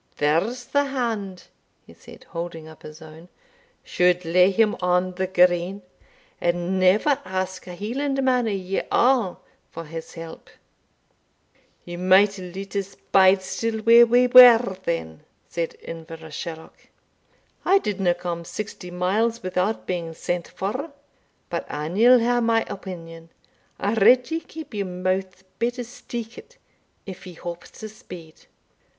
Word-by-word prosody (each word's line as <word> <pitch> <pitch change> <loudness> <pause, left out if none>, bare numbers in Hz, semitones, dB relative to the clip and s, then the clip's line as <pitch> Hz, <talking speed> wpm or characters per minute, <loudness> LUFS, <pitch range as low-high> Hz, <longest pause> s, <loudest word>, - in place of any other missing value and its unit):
There's 185 +12 0
the 285 0 +1
hand," 225 -9 -3 0.4
he - - -16
said, - - -15
holding 165 -2 -6
up 160 -1 -14
his 155 +1 -11
own, 160 +3 -14 0.5
"should 180 0 +1
lay 180 +3 +4
him 210 +2 +2
on 180 +1 +1
the 185 +1 -3
green, 180 +1 +2 0.6
and 175 +2 0
never 210 +10 +3
ask 185 0 -4
a 180 - -7
Hielandman 255 +3 0
o' - - 0
ye 195 -1 -2
a' 240 -8 +2 0.3
for 165 0 -8
his 165 +3 -9
help." 165 -1 -10 1.4
"Ye 175 0 -7
might 190 +3 +4
hae 180 -1 -8
loot 195 +2 -8
us 200 0 -3 0.2
bide 190 0 +5
still 220 +3 -3
where 235 +2 +7
we 245 +2 +4
were, 245 -4 +8
then," 80 -1 -3 0.3
said 165 -1 -4
Inverashalloch. 160 0 -9 0.7
"I 385 +2 +4
didna 195 - 0
come 175 -1 -5
sixty 195 0 -7
miles 205 +6 0
without 185 +4 -1
being 170 -3 -4
sent 175 +1 -3
for. 255 +11 -4 0.6
But - - -3
an 155 +4 -4
ye'll 245 +4 +7
hae 240 +1 +1
my 230 -1 +2
opinion, 165 -4 -9 0.5
I 200 +2 0
redd 245 +6 +4
ye 325 - 0
keep 315 -4 -11
your 200 -2 -3
mouth 185 +1 -3 0.2
better 240 +1 -1
steekit, 240 - -9 0.5
if 190 0 -9
ye 180 - -9
hope 170 +1 -7
to 220 - -10
speed. 180 -8 -13
190 Hz, 140 wpm, -23 LUFS, 175-230 Hz, 1.4 s, were